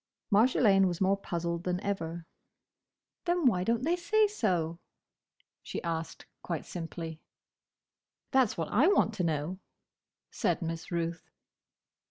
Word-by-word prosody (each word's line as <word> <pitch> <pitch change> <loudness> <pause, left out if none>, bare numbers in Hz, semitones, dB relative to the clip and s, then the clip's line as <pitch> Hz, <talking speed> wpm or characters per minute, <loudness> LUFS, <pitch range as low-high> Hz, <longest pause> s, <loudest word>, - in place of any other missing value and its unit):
Marjolaine 205 -3 +5
was 175 -2 -2
more 195 +1 +3
puzzled 170 -3 -3
than 180 0 -1
ever. 170 -4 -3 1.0
"Then, 345 -2 +1
why 185 -8 +4
don't 230 +4 +1
they 335 +5 +2
say 420 +5 +3
so?" 175 - -1 0.8
she - - -5
asked, 165 -1 -4 0.2
quite 170 -3 -4
simply. 165 -2 -6 1.1
"That's 260 -5 +3
what 165 -2 -2
I 255 +10 +4
want 370 - +3
to 200 -4 -2
know," 160 +3 -1 0.7
said - - 0
Miss 165 0 -4
Ruth. 170 0 -3
180 Hz, 125 wpm, -30 LUFS, 165-230 Hz, 1.1 s, Marjolaine